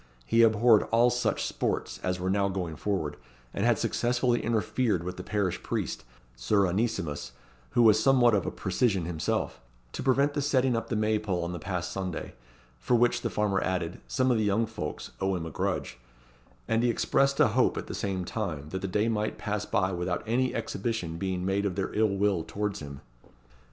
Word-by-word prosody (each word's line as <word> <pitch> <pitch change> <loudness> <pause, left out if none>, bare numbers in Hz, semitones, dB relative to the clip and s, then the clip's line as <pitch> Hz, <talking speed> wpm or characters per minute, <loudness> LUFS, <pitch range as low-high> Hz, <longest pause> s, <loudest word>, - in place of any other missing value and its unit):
He 115 - +3
abhorred 110 0 +5
all 120 +2 +4
such 120 0 0
sports - - -2
as 90 0 -1
were 95 +1 -1
now 100 0 +2
going 90 -4 -3
forward; 80 -5 -2 0.4
and - - -2
had - - +4
successfully 120 0 +1
interfered 110 -4 0
with 90 +1 -4
the 90 - -6
parish 100 -3 -1
priest, - - -3 0.3
Sir 95 - +2
Onesimus, 95 -5 -2 0.4
who 120 - +6
was 110 -1 +6
somewhat 125 -3 +5
of 100 -5 +1
a - - -1
precisian 100 -9 0
himself, 80 -2 -2 0.3
to - - -5
prevent 140 +2 +2
the 145 - -1
setting 130 -3 +2
up 115 - -2
the 115 - -1
May 110 0 +1
pole 95 -5 -2
on 85 - -3
the 90 - -5
past 90 +1 -3
Sunday, 95 -3 -4 0.5
for 60 - +1
which, 120 +1 +3
the - - -1
farmer 105 -2 0
added, 90 -2 -2
some 130 -1 +1
of 120 - +2
the - - +1
young 105 +2 +2
folks 105 -9 -6
owe 95 0 +1
him 85 -2 -4
a 80 - -6
grudge; 60 - -2 0.7
and 115 0 +2
he 120 - +2
expressed 135 +4 +2
a - - +6
hope, 125 +4 +2
at - - -3
the - - -7
same 95 -2 -2
time, 80 -9 -4
that 95 +3 -4
the 95 - -2
day 105 +4 +1
might 110 -2 -1
pass 105 -1 -3
by 95 0 +1
without 90 0 -2
any 125 +3 0
exhibition 110 -6 -3
being 95 -2 -2
made 95 +1 +1
of 100 -3 -1
their 95 -1 -2
ill 110 0 +3
will 100 -3 +2
towards 105 +2 -3
him. 70 -2 -8
105 Hz, 200 wpm, -28 LUFS, 90-115 Hz, 0.7 s, who